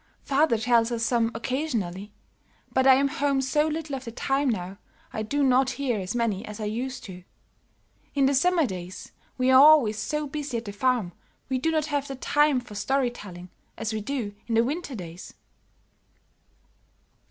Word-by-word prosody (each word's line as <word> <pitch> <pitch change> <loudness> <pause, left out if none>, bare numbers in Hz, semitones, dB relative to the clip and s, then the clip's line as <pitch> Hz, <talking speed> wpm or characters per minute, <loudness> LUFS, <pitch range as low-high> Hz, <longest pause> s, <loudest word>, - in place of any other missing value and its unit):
"Father 280 -3 +2
tells 230 +1 +2
us 230 -1 -1
some 230 -2 +2
occasionally, 225 - -3 0.6
but 260 0 +3
I 265 - +9
am 275 +1 +3
home 280 0 0
so 295 +4 +1
little 310 -2 -3
of 265 - -6
the 230 - -7
time 270 +4 0
now 195 -3 -3 0.3
I 215 - -3
do 285 +7 0
not 260 0 +4
hear 255 -6 -1
as 185 +4 -4
many 230 -5 0
as 210 0 -8
I 215 - -3
used 245 +5 -4
to. 180 -2 -10 0.9
In 275 -1 +3
the 275 - +3
summer 335 +4 +3
days 185 -4 -7 0.3
we 255 0 +3
are 260 0 +8
always 280 -8 +6
so 300 +4 -2
busy 290 -3 -4
at 230 - -6
the 205 - -5
farm 240 -4 0 0.4
we 260 -1 0
do 320 - 0
not 310 -2 +1
have 290 -2 -2
the 270 - -5
time 295 +1 +2
for 240 -4 -12
story 250 +5 0
telling 180 -6 -10 0.3
as 225 0 -3
we 215 - -2
do 230 -3 -3
in 230 - 0
the 230 - +5
winter 290 +2 -3
days." 175 -3 -9
255 Hz, 185 wpm, -26 LUFS, 215-280 Hz, 0.9 s, I